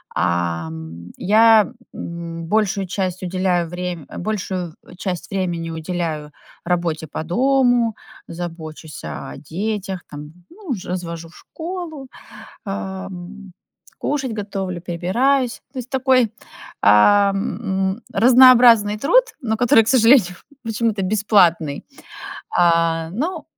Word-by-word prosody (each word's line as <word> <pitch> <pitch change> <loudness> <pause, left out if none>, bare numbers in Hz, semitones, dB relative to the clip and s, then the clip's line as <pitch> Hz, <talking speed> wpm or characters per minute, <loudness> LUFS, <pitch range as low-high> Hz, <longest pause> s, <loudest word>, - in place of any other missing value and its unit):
Ам, 85 -1 -3
я, 220 +3 +5 0.2
м, 170 -1 -7
большую 200 -1 0
часть 185 0 -3
уделяю 180 -1 0
врем 175 -2 -5
большую 185 -4 -3
в - - -15
часть 180 -2 -4
времени 175 -4 -2
уделяю 160 -2 -4 0.3
работе 170 -3 -1
по 155 - -5
дому, 245 +4 +2 0.3
забочусь 165 -2 -8
о - - -6 0.2
детях, 195 0 -3
там, 150 +1 -9 0.2
ну 365 -6 -6
ж, 195 - -7
развожу 170 -2 -5
в 165 - -19
школу, 325 -5 -7 0.6
ам, 195 -1 -7 0.5
кушать 275 -4 -2
готовлю, 195 -3 -4
прибираюсь. 235 +10 0
То 270 - -7
есть, 250 +1 -11
такой, 260 -3 +3 0.5
ам, 195 - +5 0.6
м, 235 - -16
разнообразный 235 -2 +6
труд, 410 - +4 0.2
но 220 -3 -1
который, 225 -1 +5
к - - -4
сожалению, 230 -7 +5 0.3
почему-то 225 -2 -1
бесплатный. 185 -7 +2 0.7
А, 165 -1 +2
ну, 310 - -3
190 Hz, 110 wpm, -20 LUFS, 170-230 Hz, 0.7 s, разнообразный